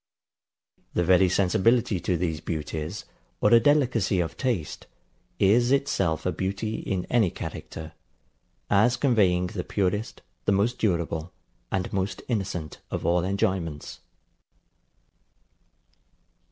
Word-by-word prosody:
The 90 - +2
very 90 +1 +5
sensibility 100 +3 +2
to 90 +1 0
these 80 -3 -2
beauties, 80 +4 -4 0.3
or - - +4
a 115 - +9
delicacy 120 -8 +2
of 85 -2 -2
taste, 115 - -3 0.5
is 120 +6 +4
itself 95 - +1
a 90 - +1
beauty 100 +5 -3
in 95 -3 -3
any 115 -6 +4
character; 80 -1 -7 0.8
as 110 +5 +3
conveying 95 -9 +3
the 90 0 -4
purest, 105 +4 -2 0.2
the 100 - +3
most 110 +6 +1
durable, 85 -4 -1 0.4
and 95 -1 -2
most 95 -1 -2
innocent 95 - -3
of - - -4
all 85 0 +2
enjoyments. 90 -5 -2
95 Hz, 115 wpm, -26 LUFS, 85-110 Hz, 0.8 s, a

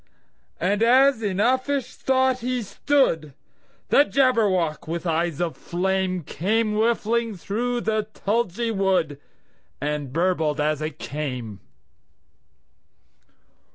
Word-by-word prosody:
And 200 +4 0
as 260 +1 +5
in 200 -4 -2
uffish 260 +4 +1
thought 260 -1 +1
he 250 0 -2
stood, 185 - 0 0.5
The 285 - +6
Jabberwock, 210 - +1
with 170 +2 -4
eyes 165 -1 0
of 175 -2 -1
flame, 185 0 -1
Came 210 +9 0
whiffling 225 0 0
through 240 +7 -2
the 215 -2 -1
tulgey 225 +1 -1
wood, 190 -8 0 0.6
And 145 -2 -3
burbled 160 -2 0
as 150 0 0
it 155 -2 -4
came! 125 -8 -5
195 Hz, 105 wpm, -24 LUFS, 160-235 Hz, 0.6 s, The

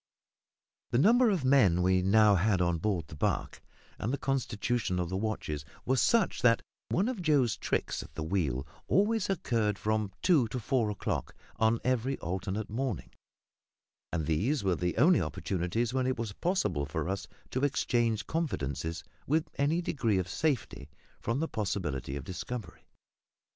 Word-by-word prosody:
The 120 - +1
number 235 - +5
of 180 -10 0
men 105 -11 +5
we 95 0 +3
now 105 +2 +5
had 100 0 +2
on 85 -2 +1
board 90 -3 -1
the 75 - -10
barque, - - -1 0.4
and 110 - -1
the 140 - 0
constitution 120 -6 -1
of 90 -2 -1
the 95 - -3
watches, 95 -8 -2 0.2
were 130 - +2
such 225 - +2
that 115 -1 +4 0.3
one 195 +6 +1
of 250 -7 -3
Joe's 140 -9 +3
"tricks" - - -2
at - - -13
the 80 - -3
wheel 75 -7 -1 0.2
always 210 +1 +2
occurred 115 - 0
from 105 0 -1
two 155 -10 +4
to 125 +3 -4
four 115 -1 +1
o'clock 105 - -3 0.2
on 110 +1 +3
every 130 +1 0
alternate 95 +4 -3
morning; 120 -2 -3 1.0
and 80 -3 -1
these 100 - +1
were 95 -2 +2
the 90 +1 -2
only 165 +9 +5
opportunities 90 - -2
when 130 -1 +1
it 130 - 0
was 115 -3 -3
possible 170 - 0
for 80 +3 -3
us 95 +1 -3 0.2
to 130 - -1
exchange 115 -6 +1
confidences 80 - -2 0.2
with 155 +2 +1
any 155 +5 +2
degree 115 - 0
of 90 -1 -1
safety 115 - -2 0.3
from 115 +4 -1
the 160 - 0
possibility 85 - -3
of 70 - -5
discovery. 95 - -7
110 Hz, 160 wpm, -30 LUFS, 90-135 Hz, 1.0 s, number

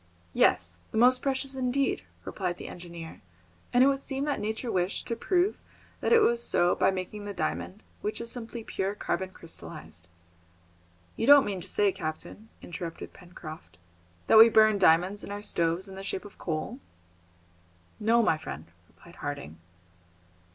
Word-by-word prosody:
"Yes, 90 0 +2
the - - -4
most 250 +2 +5
precious 270 0 -1
indeed," 260 +1 0 0.2
replied 180 -3 -3
the - - -8
engineer; 170 -2 -9 0.5
"and 245 +1 +5
it - - +6
would 275 -1 +2
seem 275 0 -3
that 290 -2 -1
nature 220 +3 -3
wished 180 +2 -1
to 230 - -2
prove 365 - +1 0.4
that - - -1
it 465 -1 +7
was 235 - +3
so 175 -5 +3
by 190 - +3
making 190 +2 -4
the 205 -1 -6
diamond, 85 - -3 0.2
which 210 - -3
is 235 0 -5
simply 235 -1 -6
pure 195 -1 -3
carbon 190 -2 -2
crystallised." 125 - -8 1.1
"You 225 - -2
don't 285 -1 +8
mean 195 -3 -3
to 180 - -8
say, 205 -1 +2
captain," 160 +7 -7
interrupted 170 -1 -7
Pencroft, 170 -3 -11 0.5
"that 220 - +7
we 225 +1 +10
burn 215 -2 +5
diamonds 180 +5 +3
in - - -8
our 205 0 -5
stoves 170 0 0
in 195 - -10
the 190 - -7
shape 195 +1 -4
of 205 - -13
coal?" 170 - -3 1.2
"No, 230 +2 +3
my 160 -7 +2
friend," 70 - -7 0.2
replied - - -18
Harding. 80 +4 -6
205 Hz, 165 wpm, -28 LUFS, 170-235 Hz, 1.2 s, we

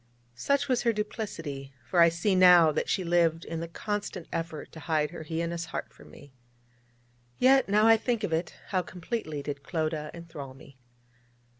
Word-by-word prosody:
Such 280 - 0
was 255 -3 +1
her 235 - +3
duplicity: 165 - -5
for 175 - 0
I 170 0 +8
see 175 +5 0
now 180 -3 +7
that 150 - -2
she 190 - +1
lived 170 -1 +2
in 165 0 -4
the 165 - -4
constant 205 0 -4
effort 165 -2 -4
to 160 - -10
hide 155 -1 0
her 175 - -8
heinous 165 +1 -3
heart 160 - -6
from - - -16
me. 145 -2 -15 1.0
Yet, 265 -2 +4
now 210 +2 +4
I 225 0 +7
think 230 -1 -1
of 175 - -1
it, 160 +1 -2
how 185 -2 +1
completely 175 -5 -5
did 140 -1 -5
Clodagh 155 0 -2
enthral 155 -6 -9
me! 135 -1 -16
170 Hz, 175 wpm, -28 LUFS, 155-200 Hz, 1.0 s, I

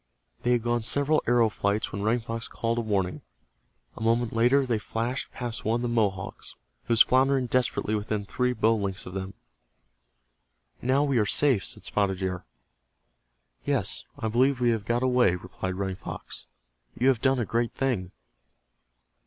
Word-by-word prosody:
They 125 - +2
had 120 -2 +1
gone 120 0 0
several 145 +6 +2
arrow 120 -1 +4
flights 105 0 -1
when 100 - -4
Running 115 +3 +1
Fox 115 0 -4
called 115 +1 -2
a - - +1
warning. 100 -5 -1 0.7
A - - -10
moment 115 +1 +1
later 125 +4 +3
they 120 -4 0
flashed 115 +4 -3
past 120 -2 -5
one 115 +2 +1
of - - -4
the - - 0
Mohawks, 100 -5 -2 0.3
who 120 - +1
was 115 - +8
floundering 130 0 +3
desperately 125 -3 0
within 105 -1 -2
three 125 +5 0
bow 115 -2 +2
lengths 100 -3 -2
of 90 - -8
them. 95 +1 -5 1.5
"Now 130 +3 +2
we 140 -4 +2
are 105 - +2
safe," 130 -7 +3
said - - -5
Spotted 100 -2 0
Deer. 90 -1 -3 1.2
"Yes, - - -1
I 115 - -2
believe 130 +4 +2
we 120 -1 +3
have 110 -2 -2
got 120 +1 0
away," 125 -8 +3
replied 90 +1 -5
Running 95 -1 -3
Fox. - - -8 0.5
"You 130 - +2
have 125 -4 +1
done 135 0 +3
a 120 - 0
great 115 +5 -1
thing." 115 -10 -1
115 Hz, 170 wpm, -27 LUFS, 100-125 Hz, 1.5 s, was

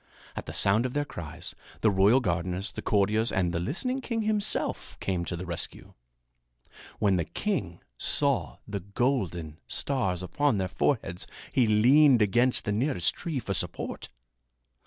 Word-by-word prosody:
At - - -6
the - - -6
sound 110 +5 +3
of 125 - -8
their 145 0 0
cries, 80 - -6 0.3
the 110 - +4
royal 100 +7 +5
gardeners, 90 +1 -1
the - - -6
courtiers 105 +2 +2
and 90 -2 +1
the 85 - 0
listening 250 - -2
king 230 -3 -2
himself 215 -1 0
came 90 -3 -1
to 90 - -3
the 90 - -6
rescue. 85 -2 -6 1.0
When 100 -3 +2
the 85 - 0
king - - -3 0.2
saw - - +1
the 100 -1 -3
golden 95 - -2
stars 95 -10 -1
upon 145 +5 +1
their 95 -1 0
foreheads 95 -2 -1 0.2
he 125 -4 +3
leaned 125 +5 +6
against 120 +5 +2
the 105 - 0
nearest 110 - +1
tree 165 -5 -4
for 100 -6 -2
support. 90 -1 -3
105 Hz, 155 wpm, -28 LUFS, 90-130 Hz, 1.0 s, leaned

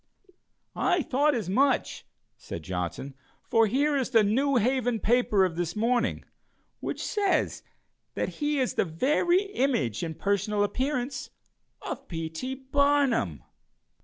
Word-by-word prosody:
"I 355 -3 +1
thought 285 +3 +2
as 220 -7 -3
much," 260 +7 +1 0.3
said 85 - -8
Johnson, 90 - -4 0.3
"for 225 -1 +3
here 285 +6 +1
is 265 -3 0
the 225 -4 +5
New 265 +7 +2
Haven 245 0 +1
paper 215 -3 +3
of 175 -3 -3
this 175 -1 -2
morning, 235 +3 0 0.5
which - - -4
says 405 -3 0 0.5
that - - -1
he 295 0 +1
is 255 - 0
the - - +2
very 300 - +2
image, 250 - -1
in 160 -1 -4
personal 205 +2 0
appearance, 260 +4 -2 0.5
of - - -6
P. 165 -2 -4
T. 255 +11 -4
Barnum." 270 - +1
245 Hz, 130 wpm, -27 LUFS, 190-275 Hz, 0.5 s, the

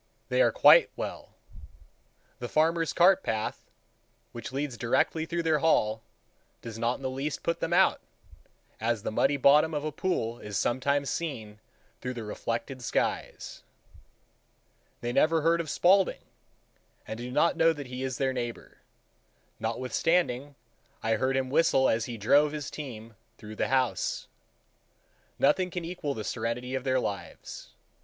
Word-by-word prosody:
They - - +2
are - - +4
quite - - +7
well. - - -6 1.0
The - - -5
farmer's 165 +1 +2
cart 180 +2 +5
path, 110 -1 -3 0.6
which 120 0 -7
leads 135 -1 -3
directly 160 +7 0
through 170 0 -2
their 160 -2 +2
hall, 110 -8 +2 0.6
does 115 -1 -7
not 120 +2 +1
in - - -12
the - - 0
least 140 +3 -4
put 170 - -1
them 165 - -2
out, 185 +2 +4 0.8
as 115 -1 -1
the - - -2
muddy 135 +6 +2
bottom 150 +4 +5
of 145 - -2
a 155 - -2
pool 125 -9 -2
is 105 -2 -5
sometimes 140 +2 0
seen 110 -11 -5 0.4
through 125 0 -4
the 115 - -5
reflected 115 +4 -4
skies. - - -2 1.4
They 120 0 -3
never 165 +3 +3
heard 170 +1 +3
of 160 - -7
Spaulding, 190 +4 +3 0.8
and 110 - -6
do 120 +1 -5
not 150 +6 +2
know 165 - +4
that 145 -3 -6
he 125 0 -7
is 130 -2 -3
their 135 -1 0
neighbor,—notwithstanding 125 +4 -3 0.5
I 115 - +1
heard 130 0 0
him 130 -1 -2
whistle 135 -4 +4
as 110 0 +1
he 120 -2 -6
drove 145 +8 +3
his 150 -3 -5
team 115 -6 -8 0.2
through 110 0 -10
the - - 0
house. 130 -2 0 1.1
Nothing 180 +6 +3
can 175 -1 -5
equal 165 -5 -4
the 110 - -5
serenity 120 +3 -3
of 130 0 -3
their 130 -1 +2
lives. 100 -8 -6
135 Hz, 150 wpm, -28 LUFS, 120-160 Hz, 1.4 s, quite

